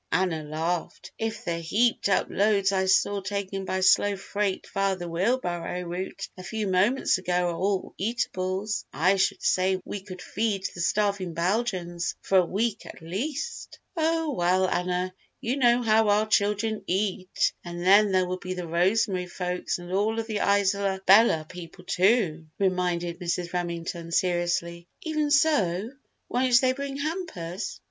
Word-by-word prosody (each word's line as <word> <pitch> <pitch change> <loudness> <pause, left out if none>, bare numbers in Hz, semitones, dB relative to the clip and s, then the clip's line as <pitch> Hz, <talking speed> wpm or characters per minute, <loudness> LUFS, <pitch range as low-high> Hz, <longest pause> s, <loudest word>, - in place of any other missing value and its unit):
Anna 180 -4 +1
laughed. 160 +3 -3
"If 225 -1 -3
the 170 -1 -1
heaped 215 +7 +1
up 195 - +3
loads 200 -1 +2
I 190 -1 +1
saw 200 +1 +3
taken 195 0 -4
by 190 0 -1
slow 205 +2 +4
freight 200 0 -2
via 195 -1 +1
the 175 -1 -6
wheel 185 +10 +1
barrow 175 -4 -4
route 180 +3 -5
a 185 - -9
few 215 +4 -3
moments 195 +4 +2
ago 180 -1 0
are - - -4
all 195 +1 -1
eatables, 195 -1 -2
I 185 +5 +2
should 190 - 0
say 185 0 +2
we 205 - -5
could 185 -2 -10
feed 200 +1 -1
the 175 - -6
starving 200 -2 0
Belgians 175 -2 -1
for 190 - +4
a - - +4
week, 215 +3 -1
at - - -11
least!" 270 - -4 0.2
"Oh, 325 -2 +1
well, 185 -2 +2
Anna, 180 +1 -1 0.3
you 245 +4 -2
know 245 -2 +4
how 220 -1 +4
our 210 +1 +3
children 210 +1 +1
eat 185 0 0
and 175 0 -6
then 200 +2 +6
there 185 -1 +3
will 185 +1 -4
be 185 0 -5
the 180 -2 -5
Rosemary 180 +2 +1
folks 180 0 -3
and 175 0 -9
all 210 +3 +1
of 225 - -1
the 215 -2 -3
Isola 200 -1 +2
Bella 195 -5 +6
people, 180 +1 -10
too!" 180 -5 +2
reminded 180 -2 0
Mrs. 175 -1 -3
Remington, 170 -1 -4
seriously. 175 -1 0 0.2
"Even 310 -3 -1
so, 230 - +2 0.4
won't 250 0 +3
they 255 -1 +2
bring 275 0 -5
hampers?" 285 - -4
190 Hz, 160 wpm, -26 LUFS, 180-215 Hz, 0.4 s, then